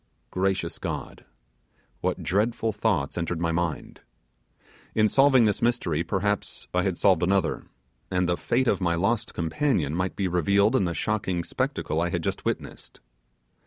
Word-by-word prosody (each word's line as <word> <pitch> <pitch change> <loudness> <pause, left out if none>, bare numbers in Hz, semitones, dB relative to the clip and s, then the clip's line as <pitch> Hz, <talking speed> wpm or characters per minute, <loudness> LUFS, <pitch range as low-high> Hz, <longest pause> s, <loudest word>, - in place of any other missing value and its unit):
Gracious 95 +1 -1
God! - - -5 0.7
what - - -2
dreadful 110 +3 0
thoughts 100 -8 0
entered 85 0 -2
my 85 -1 0 0.2
head; - - -15 1.0
in 110 -1 +4
solving 135 0 +5
this 105 -2 +1
mystery 115 -10 +1
perhaps 100 +3 -2
I 90 - +2
had 90 -2 -1
solved 95 -4 +4
another, 95 +2 +1 0.4
and 90 -1 +1
the 90 - +2
fate 125 +7 0
of - - +2
my 85 -2 +1
lost 110 +5 0
companion 85 - 0
might 90 +2 -1
be 95 - 0
revealed 100 - +3
in 100 - +3
the 85 -1 -2
shocking 95 -1 -1
spectacle 80 -1 -2
I 85 - 0
had 85 -2 -2
just - - -3
witnessed. - - -4
95 Hz, 155 wpm, -26 LUFS, 85-110 Hz, 1.0 s, solving